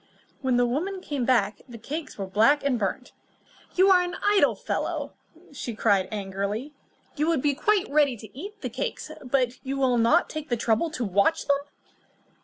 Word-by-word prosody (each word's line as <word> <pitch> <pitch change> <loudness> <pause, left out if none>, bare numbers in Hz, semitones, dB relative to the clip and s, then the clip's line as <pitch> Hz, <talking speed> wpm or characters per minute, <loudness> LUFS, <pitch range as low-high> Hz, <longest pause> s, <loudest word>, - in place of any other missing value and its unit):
When 260 -2 +1
the 245 - +4
woman 345 +11 -2
came 285 -8 -3
back, 235 -4 +2
the 235 - -9
cakes 300 +8 -6
were 195 - -3
black 225 +10 +3
and 265 -4 +1
burnt. 205 +5 -3 0.6
"You 380 +1 +5
are 365 -1 +6
an 355 0 -3
idle 410 -1 +4
fellow," - - -3 0.6
cried 200 -4 +3
she - - -18
angrily. 200 +7 -4 0.4
"You 300 +2 +1
would 330 -6 +1
be 290 -1 +3
quite 415 +7 +1
ready 285 -4 +2
to 215 0 -13
eat 405 +9 -8
the - - -3
cakes, - - -4
but 250 -1 0
you 270 0 -3
will 255 -3 +2
not 265 +10 +4
take 310 0 -6
the 240 - +1
trouble 225 +8 +1
to 250 -6 -3
watch 200 - +2
them." 280 -1 +2
265 Hz, 185 wpm, -26 LUFS, 230-315 Hz, 0.6 s, are